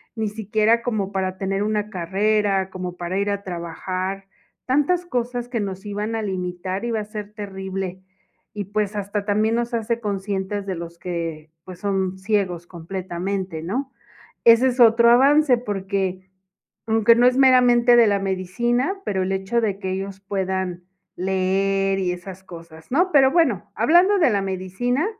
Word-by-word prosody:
Ni 220 Hz, -1 st, -1 dB
siquiera 215 Hz, +2 st, +1 dB
como 215 Hz, -5 st, -2 dB
para 190 Hz, -1 st, -2 dB
tener 195 Hz, +1 st, -2 dB
una 210 Hz, 0 st, -1 dB
carrera, 195 Hz, +1 st, 0 dB
como 180 Hz, -1 st, -6 dB
para 175 Hz, +2 st, -3 dB
ir 200 Hz, +1 st, 0 dB
a 200 Hz, 0 st, -2 dB
trabajar, 185 Hz, +2 st, -4 dB, 0.4 s
tantas 295 Hz, +7 st, +1 dB
cosas 245 Hz, -5 st, -2 dB
que 240 Hz, -2 st, -2 dB
nos 195 Hz, 0 st, -5 dB
iban 210 Hz, +2 st, -3 dB
a 225 Hz, -, -1 dB
limitar, 185 Hz, -1 st, -3 dB
iba 235 Hz, -2 st, -1 dB
a 210 Hz, -, -4 dB
ser 210 Hz, -1 st, -7 dB
terrible. 190 Hz, -3 st, -5 dB, 0.5 s
Y 205 Hz, -1 st, -4 dB
pues, 210 Hz, +1 st, -2 dB
hasta 205 Hz, 0 st, -3 dB
también 215 Hz, +2 st, +1 dB
nos 240 Hz, +1 st, -2 dB
hace 230 Hz, 0 st, -1 dB
conscientes 200 Hz, -1 st, -3 dB
de 190 Hz, -2 st, -3 dB
los 170 Hz, 0 st, -8 dB
que, 165 Hz, -3 st, -5 dB, 0.2 s
pues, 180 Hz, -1 st, -10 dB
son 190 Hz, -1 st, -1 dB
ciegos 190 Hz, -3 st, -1 dB
completamente, 180 Hz, 0 st, -4 dB
¿no? 255 Hz, +10 st, -3 dB, 0.5 s
Ese 235 Hz, +2 st, +7 dB
es 255 Hz, 0 st, -2 dB
otro 235 Hz, 0 st, +6 dB
avance 275 Hz, +2 st, +5 dB
porque, 195 Hz, -4 st, -3 dB, 0.6 s
aunque 225 Hz, 0 st, +5 dB
no 240 Hz, +1 st, +5 dB
es 250 Hz, 0 st, +4 dB
meramente 245 Hz, -2 st, +5 dB
de 235 Hz, -1 st, +7 dB
la 200 Hz, -1 st, +2 dB
medicina, 240 Hz, -, -1 dB
pero 190 Hz, -2 st, -1 dB
el 185 Hz, -, -3 dB
hecho 195 Hz, +5 st, 0 dB
de 205 Hz, -4 st, -1 dB
que 190 Hz, -, -3 dB
ellos 195 Hz, 0 st, -4 dB
puedan 190 Hz, -2 st, -3 dB, 0.3 s
leer 195 Hz, +1 st, 0 dB
y 185 Hz, -2 st, 0 dB
esas 180 Hz, +1 st, -9 dB
cosas, 165 Hz, -3 st, -12 dB
¿no?, 355 Hz, +8 st, +2 dB
pero 270 Hz, -2 st, +6 dB
bueno, 290 Hz, -, +1 dB
hablando 350 Hz, -, +4 dB
de 315 Hz, -8 st, +4 dB
la 205 Hz, -2 st, +1 dB
medicina, 195 Hz, -, -1 dB
200 Hz, 160 wpm, -22 LUFS, 190-230 Hz, 0.6 s, Ese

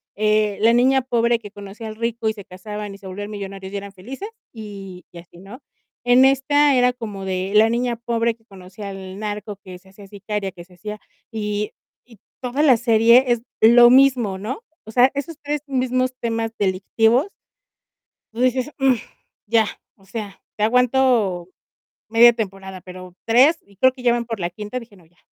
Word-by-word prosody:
eh, 215 Hz, -1 st, +1 dB
la 230 Hz, +2 st, +5 dB
niña 260 Hz, +2 st, +4 dB
pobre 235 Hz, -2 st, +1 dB
que 205 Hz, -3 st, -11 dB
conocía 205 Hz, +2 st, -9 dB
al 215 Hz, -, -7 dB
rico 230 Hz, 0 st, -2 dB
y -, -, -2 dB
se 205 Hz, -3 st, -11 dB
casaban 210 Hz, +2 st, -7 dB
y -, -, -11 dB
se 195 Hz, -, -11 dB
volvían 205 Hz, +3 st, -6 dB
millonarios 195 Hz, -1 st, -7 dB
y -, -, -2 dB
eran 200 Hz, 0 st, -8 dB
felices, 260 Hz, -, -8 dB, 0.2 s
y 200 Hz, -5 st, -9 dB
y 175 Hz, -, -13 dB
así, 170 Hz, 0 st, -16 dB
¿no? 205 Hz, +9 st, -12 dB, 0.4 s
En 245 Hz, +2 st, +6 dB
esta 275 Hz, +1 st, +3 dB
era 250 Hz, 0 st, +3 dB
como 210 Hz, -6 st, -7 dB
de 190 Hz, +1 st, -3 dB
la 220 Hz, +1 st, +6 dB
niña 240 Hz, +1 st, 0 dB
pobre 235 Hz, 0 st, -1 dB
que 225 Hz, -1 st, -34 dB
conocía 195 Hz, 0 st, -10 dB
al 190 Hz, 0 st, -8 dB
narco, 210 Hz, -1 st, -5 dB
que 180 Hz, -1 st, -10 dB
se 190 Hz, +1 st, -22 dB
hacía 195 Hz, +1 st, -15 dB
sicaria, 205 Hz, 0 st, -4 dB
que 175 Hz, -2 st, -12 dB
se 180 Hz, 0 st, -20 dB
hacía, 210 Hz, +4 st, -7 dB, 0.3 s
y 210 Hz, -1 st, -3 dB, 0.3 s
y 230 Hz, -5 st, -19 dB, 0.2 s
toda 255 Hz, +3 st, -2 dB
la 265 Hz, -6 st, +6 dB
serie 235 Hz, +2 st, +5 dB
es 240 Hz, -1 st, +1 dB, 0.2 s
lo 240 Hz, +2 st, +8 dB
mismo, 255 Hz, -7 st, +4 dB
¿no? 245 Hz, -, -5 dB, 0.2 s
O 220 Hz, -, -10 dB
sea, 250 Hz, +3 st, +5 dB
esos 285 Hz, +3 st, -5 dB
3 295 Hz, 0 st, -3 dB
mismos 255 Hz, -1 st, 0 dB
temas 225 Hz, -1 st, -2 dB
delictivos 220 Hz, -, +1 dB, 1.1 s
tú 230 Hz, -, -6 dB
dices: 255 Hz, +1 st, +1 dB
"mm 270 Hz, -1 st, +4 dB, 0.5 s
ya", 225 Hz, +1 st, +3 dB, 0.3 s
o 195 Hz, -, -25 dB
sea, 200 Hz, -1 st, -7 dB, 0.2 s
te 210 Hz, -, 0 dB
aguanto 240 Hz, -6 st, +2 dB, 0.6 s
media 235 Hz, +2 st, +6 dB
temporada, 195 Hz, -4 st, -6 dB
pero, 185 Hz, -1 st, -11 dB
¿3?, 260 Hz, +8 st, +5 dB
y 200 Hz, -1 st, -23 dB
creo 260 Hz, +6 st, +5 dB
que 255 Hz, -1 st, -13 dB
ya 240 Hz, -, +4 dB
van 240 Hz, 0 st, -2 dB
por 225 Hz, -2 st, -5 dB
la 175 Hz, -1 st, -2 dB
quinta, 210 Hz, +6 st, -6 dB
dije: 230 Hz, -3 st, -15 dB
"No, 180 Hz, -3 st, -20 dB
ya". 175 Hz, +2 st, -35 dB
220 Hz, 190 wpm, -21 LUFS, 195-245 Hz, 1.1 s, lo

